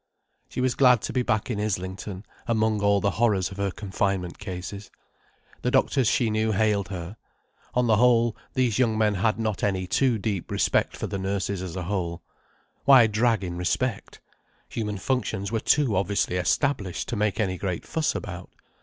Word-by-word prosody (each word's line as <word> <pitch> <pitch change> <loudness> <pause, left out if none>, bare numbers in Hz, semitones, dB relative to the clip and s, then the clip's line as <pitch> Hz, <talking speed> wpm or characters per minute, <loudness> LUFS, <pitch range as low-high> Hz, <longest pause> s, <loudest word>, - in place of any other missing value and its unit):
She - - -3
was 130 -1 +2
glad 125 -4 +5
to - - -3
be 125 - +2
back 110 0 0
in 105 - -2
Islington, 95 0 -4 0.2
among 110 -2 +1
all 100 -1 +3
the 100 - +1
horrors 100 -5 +2
of 95 - -9
her 100 0 0
confinement 95 -2 -2
cases. 100 +1 -6 0.7
The - - 0
doctors 130 -5 +2
she 115 -1 +2
knew 110 0 +1
hailed 105 -2 +1
her. 90 +2 -6 0.6
On 125 0 +3
the 110 -2 +4
whole, 120 -1 +4 0.2
these 130 -3 +1
young 115 -4 +2
men 105 -1 +3
had 105 +3 +1
not 110 -3 -2
any 95 -2 0
too 125 +5 +2
deep 100 -3 -3
respect - - +1
for - - -3
the 100 - -4
nurses 95 0 -2
as 90 -2 -6
a 90 - -3
whole. 85 -2 -3 0.6
Why 135 -4 +8
drag 110 0 +1
in 85 -1 -4
respect? 100 +5 -2 0.5
Human 105 -3 -3
functions 100 -2 -2
were 115 - 0
too 135 -2 +2
obviously 100 -1 0
established 95 - 0
to 120 - -2
make 105 -1 0
any 95 -4 0
great 90 -3 -3
fuss 160 -2 -1
about. - - -6
105 Hz, 180 wpm, -25 LUFS, 95-115 Hz, 0.7 s, Why